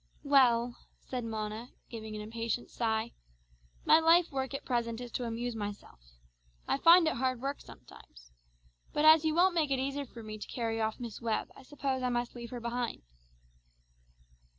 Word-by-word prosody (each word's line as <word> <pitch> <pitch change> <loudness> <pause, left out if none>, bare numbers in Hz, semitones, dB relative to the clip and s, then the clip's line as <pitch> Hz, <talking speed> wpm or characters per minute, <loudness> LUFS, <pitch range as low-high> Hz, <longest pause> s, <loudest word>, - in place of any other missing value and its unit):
"Well," 245 -4 +4 0.2
said 250 -2 -5
Mona 220 +1 -5 0.2
giving 220 -2 -7
an 210 - -5
impatient 230 +2 -3
sigh, 225 0 -1 0.7
"my - - +7
life 330 +1 +4
work 265 0 -3
at - - -6
present 235 -2 -1
is 245 -1 -7
to 245 - -3
amuse 235 +1 -3
myself. 205 - -6 0.7
I - - +1
find 335 +1 +7
it 315 - +2
hard 255 0 0
work 275 +3 -3
sometimes. - - -15 0.6
But 295 - +2
as 315 0 +8
you 315 0 +1
won't 365 +2 +4
make 320 -4 +1
it 270 - +1
easy 275 +2 -2
for 235 -2 -11
me 215 0 -7
to - - -7
carry 225 -2 -2
off 220 0 -1
Miss 235 -3 -7
Webb 225 -2 -1
I - - -13
suppose 270 -1 -3
I 250 - 0
must 240 0 -2
leave 235 -1 -8
her 245 - -6
behind." 235 - -3
240 Hz, 175 wpm, -31 LUFS, 225-275 Hz, 0.7 s, as